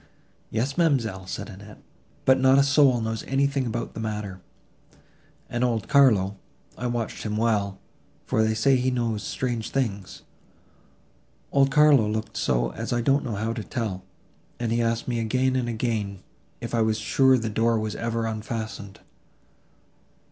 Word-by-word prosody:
"Yes, 130 Hz, +9 st, -2 dB
ma'amselle," 115 Hz, -, +1 dB
said 100 Hz, +2 st, -5 dB
Annette, 100 Hz, +1 st, -12 dB, 0.5 s
"but 130 Hz, 0 st, +5 dB
not 130 Hz, +1 st, +5 dB
a 140 Hz, -, +6 dB
soul 140 Hz, -3 st, +4 dB
knows 110 Hz, -1 st, -2 dB
anything 135 Hz, -1 st, 0 dB
about 115 Hz, +1 st, -4 dB
the -, -, -7 dB
matter: 105 Hz, -4 st, -4 dB, 1.1 s
and 120 Hz, +1 st, -2 dB
old 115 Hz, -5 st, 0 dB
Carlo—I 110 Hz, -2 st, +1 dB
watched 120 Hz, -2 st, -3 dB
him 105 Hz, -1 st, -3 dB
well, 105 Hz, -4 st, 0 dB, 0.5 s
for 110 Hz, -, +1 dB
they 110 Hz, 0 st, +2 dB
say 130 Hz, +5 st, +3 dB
he 125 Hz, +1 st, +1 dB
knows 115 Hz, -4 st, -1 dB
strange 120 Hz, +2 st, -3 dB
things—old 130 Hz, +4 st, -5 dB
Carlo 140 Hz, -6 st, +5 dB
looked 110 Hz, 0 st, -3 dB
so -, -, 0 dB
as -, -, -5 dB
I 120 Hz, -1 st, +1 dB
don't 135 Hz, +4 st, +2 dB
know 115 Hz, -4 st, -3 dB
how 110 Hz, +3 st, -2 dB
to 110 Hz, -, -5 dB
tell, 110 Hz, -8 st, -3 dB, 0.6 s
and 120 Hz, -2 st, -1 dB
he 120 Hz, +1 st, +1 dB
asked 115 Hz, 0 st, -1 dB
me 120 Hz, -2 st, -1 dB
again 130 Hz, +3 st, +1 dB
and 125 Hz, -2 st, 0 dB
again, 110 Hz, -5 st, -2 dB, 0.4 s
if -, -, -6 dB
I 115 Hz, -, +2 dB
was 110 Hz, -1 st, +1 dB
sure 130 Hz, +1 st, +3 dB
the 115 Hz, -2 st, -3 dB
door 115 Hz, +2 st, +2 dB
was 110 Hz, -1 st, -3 dB
ever 115 Hz, 0 st, -2 dB
unfastened. 110 Hz, -2 st, -5 dB
115 Hz, 155 wpm, -25 LUFS, 105-130 Hz, 1.1 s, a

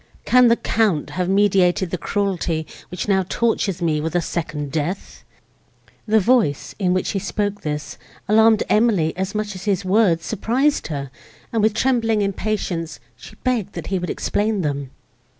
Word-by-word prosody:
Can 250 Hz, 0 st, +6 dB
the 230 Hz, -, +5 dB
Count 215 Hz, -10 st, 0 dB
have 180 Hz, 0 st, -2 dB
meditated 190 Hz, -2 st, +3 dB
the 180 Hz, -, -1 dB
cruelty, 180 Hz, -5 st, -1 dB, 0.2 s
which 180 Hz, -, -5 dB
now 190 Hz, -2 st, +3 dB
tortures 200 Hz, -6 st, 0 dB
me 155 Hz, -2 st, +1 dB
with 160 Hz, +2 st, -3 dB
a -, -, +4 dB
second 150 Hz, -4 st, -4 dB
death?" 160 Hz, +6 st, -4 dB, 0.8 s
The 220 Hz, +1 st, +4 dB
voice, 210 Hz, -, +1 dB
in 185 Hz, -3 st, +1 dB
which 185 Hz, 0 st, 0 dB
he 195 Hz, -, -1 dB
spoke 205 Hz, +1 st, -2 dB
this, 150 Hz, -1 st, -5 dB, 0.3 s
alarmed 220 Hz, +1 st, +5 dB
Emily 210 Hz, -8 st, +2 dB
as 190 Hz, +3 st, -3 dB
much 210 Hz, 0 st, -2 dB
as 185 Hz, +1 st, -9 dB
his 200 Hz, -2 st, 0 dB
words 185 Hz, -4 st, +3 dB
surprised 255 Hz, +7 st, 0 dB
her, 140 Hz, -4 st, -5 dB, 0.4 s
and, 225 Hz, -, +2 dB
with 215 Hz, 0 st, +2 dB
trembling 225 Hz, -4 st, +2 dB
impatience, 190 Hz, -5 st, -2 dB, 0.2 s
she -, -, -13 dB
begged 235 Hz, -6 st, -1 dB
that 170 Hz, -3 st, -6 dB
he 190 Hz, -, +1 dB
would 180 Hz, -, -4 dB
explain 210 Hz, -1 st, -1 dB
them. 140 Hz, -4 st, -2 dB
195 Hz, 165 wpm, -21 LUFS, 170-215 Hz, 0.8 s, Can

